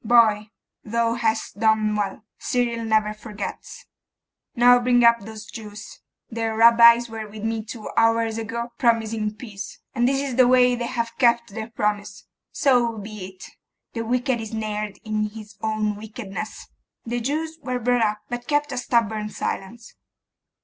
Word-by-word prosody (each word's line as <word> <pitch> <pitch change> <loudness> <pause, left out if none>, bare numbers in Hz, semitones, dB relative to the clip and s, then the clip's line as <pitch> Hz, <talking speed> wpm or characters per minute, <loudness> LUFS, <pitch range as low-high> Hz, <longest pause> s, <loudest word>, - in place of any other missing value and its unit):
Boy, 220 -2 +4 0.3
thou 230 +1 0
hast 220 -3 -1
done 220 -1 +2
well. 210 +1 -3
Cyril 235 -2 -1
never 215 -1 +2
forgets. 215 - -8 0.7
Now 245 +1 +6
bring 245 0 +3
up 235 0 +6
those 220 +1 -9
Jews. 215 -2 -10 0.3
Their 225 -1 -3
Rabbis 235 +1 +7
were 220 -1 -6
with 210 0 -10
me 225 0 -1
two 220 0 -8
hours 225 0 +2
ago 235 +1 -4
promising 225 -3 +1
peace: 210 -3 -8 0.2
and 240 +1 +2
this 270 +1 +1
is 275 -3 -3
the 255 -1 +6
way 250 0 +5
they 240 -1 -2
have 230 -1 -3
kept 235 -4 +3
their 220 +1 -5
promise. 210 -2 -2 0.3
So 240 -4 +2
be 210 -2 -7
it. 185 -1 -13 0.4
The 230 - -3
wicked 245 +1 0
is 220 - -6
snared 215 -2 -4
in 215 0 -1
his 215 0 -11
own 215 -1 -1
wickedness.' 215 -1 -7 0.4
The 240 +1 -2
Jews 315 +6 -3
were 255 -1 -2
brought 245 0 +1
in, 210 -1 +1
but 245 0 -5
kept 295 -1 +1
a 255 - -4
stubborn 220 -3 0
silence. 220 +3 -5
225 Hz, 155 wpm, -23 LUFS, 215-240 Hz, 0.7 s, Rabbis